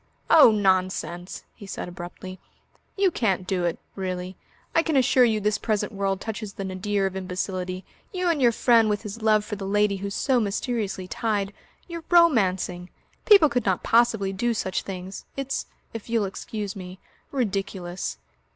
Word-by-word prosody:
"Oh, 315 -6 +9
nonsense!" 185 -4 0
he 200 - -12
said - - -5
abruptly. 180 +1 -8 0.6
"You 390 -2 +3
can't 195 - 0
do 180 -2 0
it 170 - -1 0.2
really. 185 -1 -4 0.4
I 330 - +5
can 320 -3 0
assure 255 -1 +5
you 220 -2 +1
this 210 0 0
present 215 -1 -1
world 195 -2 -1
touches 215 -1 -5
the 195 - -5
nadir 195 +1 -1
of 190 -1 -2
imbecility. 185 0 -4 0.3
You 365 -3 -1
and 325 -5 +1
your 240 -2 +6
friend, 230 -1 +4
with 210 +1 -1
his 215 +1 -7
love 215 -1 +3
for 210 -2 -5
the 195 -1 -5
lady 205 0 +2
who's 200 +1 -4
so 260 -3 +2
mysteriously 205 -3 -2
tied 205 -1 -1 0.3
you're 335 -2 -6
romancing! 190 - +3 0.4
People 400 -7 +8
could 245 -5 -1
not 190 -2 +1
possibly 225 -4 +3
do 235 +4 0
such 190 -3 -1
things. 190 0 -7
It's 275 0 -3 0.3
if 225 0 -7
you'll 230 -3 +1
excuse 200 +1 -5
me 185 -1 -8 0.3
ridiculous. 195 - -3
200 Hz, 165 wpm, -25 LUFS, 185-230 Hz, 0.6 s, Oh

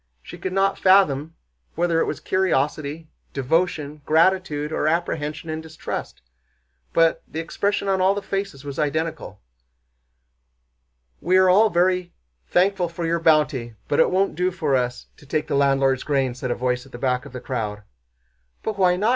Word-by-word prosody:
She - - -10
could 185 - -3
not 195 +1 +1
fathom 165 -5 +3 0.4
whether 170 -1 +1
it - - +2
was - - -3
curiosity, 155 -3 -1 0.3
devotion, 150 +1 -1
gratitude, 160 -2 +2
or 155 - 0
apprehension 160 -1 -2
and 155 0 -4
distrust—but 60 - -4
the 160 - -6
expression 200 +5 -1
on 190 -1 +1
all 190 +2 +3
the 205 - -4
faces 195 -9 -4
was 140 +1 -6
identical. 155 - -2 1.8
"We 185 +3 +3
are 185 -1 +5
all 215 +4 +5
very 180 0 +1 0.3
thankful 185 -1 +2
for 170 0 -5
your 170 +1 0
bounty, 150 -8 +2
but 145 - 0
it - - +5
won't 195 +2 +1
do 180 +2 +1
for 155 -6 0
us 125 -1 -1
to 145 - -18
take 155 +2 -1
the 155 - -4
landlord's 135 -2 +2
grain," 135 -4 0
said 125 +1 -5
a 120 - 0
voice 125 0 -1
at - - -19
the 120 - -8
back 125 0 -1
of - - -13
the 125 - -6
crowd. 105 -5 -4 0.8
"But 215 -2 -3
why 180 -1 +4
not?" 205 +5 +1
160 Hz, 165 wpm, -23 LUFS, 135-180 Hz, 1.8 s, are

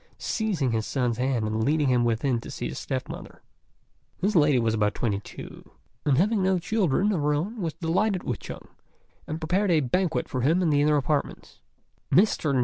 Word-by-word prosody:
seizing 190 - -1
his 110 -1 -1
son's 125 -4 -1
hand 125 -3 0
and 110 +1 -1
leading 150 +3 +2
him 125 -2 +3
within 120 +1 0
to - - -9
see - - -4
his - - -6
step - - -3
mother. - - -9 0.8
This 200 +3 0
lady 150 -4 +5
was 115 -2 +1
about 105 -1 +1
twenty 105 -5 -1
two, - - -11 0.4
and, 135 -3 +4
having 205 +5 +2
no 190 0 +2
children 195 0 +1
of 180 -7 0
her 150 0 +2
own, 200 +9 -3
was 165 -3 -2
delighted 190 +3 0
with - - -3
Chung, - - -9 0.6
and 155 +1 -4
prepared 185 +5 0
a 165 -3 +4
banquet 160 +5 0
for 130 - -3
him 165 +8 +2
in 165 - +2
the 145 -1 +3
inner 150 0 +3
apartments. 145 +1 -2 0.5
Mr. 180 -6 +3
150 Hz, 195 wpm, -26 LUFS, 125-185 Hz, 0.8 s, lady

